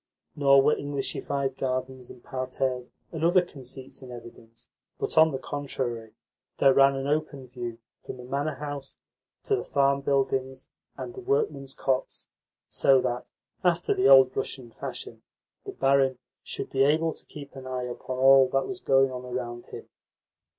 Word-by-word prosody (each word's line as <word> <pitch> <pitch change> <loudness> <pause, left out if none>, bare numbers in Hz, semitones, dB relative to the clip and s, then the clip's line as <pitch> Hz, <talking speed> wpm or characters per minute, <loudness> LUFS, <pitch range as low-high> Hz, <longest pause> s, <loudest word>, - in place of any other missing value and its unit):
Nor 140 -1 +5
were 150 - +4
Englishified 140 -1 -3
gardens 130 -1 -3
and 120 - -13
parterres 130 -1 -3 0.2
and 160 -1 -5
other 175 +2 +5
conceits 135 -5 -8
in 130 - -10
evidence, 115 -1 -12 0.3
but, - - -3
on 160 0 +7
the 135 - -2
contrary, 130 -5 -4 0.4
there 135 -1 +5
ran 135 0 +5
an 135 0 -3
open 145 -2 -2
view 120 -2 -6 0.3
from - - -7
the 125 - -10
manor 140 +4 -2
house 145 -1 -6 0.5
to 410 - +1
the - - -3
farm 140 0 +2
buildings 135 -1 -1 0.3
and 365 - -6
the 385 - -8
workmen's 385 - -1
cots, 130 -1 -2 0.4
so 135 -1 +4
that, 120 +1 -3 0.3
after 175 -1 +2
the 190 - +2
old 130 -1 +7
Russian 125 -3 -4
fashion, - - -7 0.5
the - - -3
barin 135 -1 +2 0.2
should - - -5
be 135 - +1
able 155 +3 +3
to - - -10
keep 140 -2 -11
an 130 -1 -9
eye 130 -1 -3
upon 125 +1 -5
all 135 0 +7
that 135 0 +1
was 190 - -5
going 135 -3 +3
on 125 0 -6
around 120 -1 -5
him. - - -9
135 Hz, 165 wpm, -27 LUFS, 130-140 Hz, 0.5 s, on